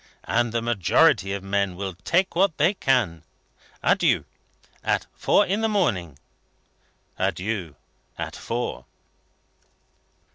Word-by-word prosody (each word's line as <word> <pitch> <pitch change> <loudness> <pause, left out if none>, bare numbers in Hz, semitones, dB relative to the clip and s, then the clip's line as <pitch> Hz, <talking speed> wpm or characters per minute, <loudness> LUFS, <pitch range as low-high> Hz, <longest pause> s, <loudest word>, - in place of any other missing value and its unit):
And 120 0 +1
the 115 0 -1
majority 110 - +3
of 100 -1 -4
men 100 -1 0
will 95 0 -4
take 165 - 0
what 185 -2 +2
they 190 - +3
can 120 - +1 0.6
get. - - +3
Adieu! - - +2 0.6
At - - 0
four 205 - +3
in 200 +4 -1
the 225 - +1
morning." 95 - 0 1.0
"Adieu! 95 -6 -2 0.4
At - - -5
four." 115 - -4
110 Hz, 115 wpm, -24 LUFS, -, 1.0 s, majority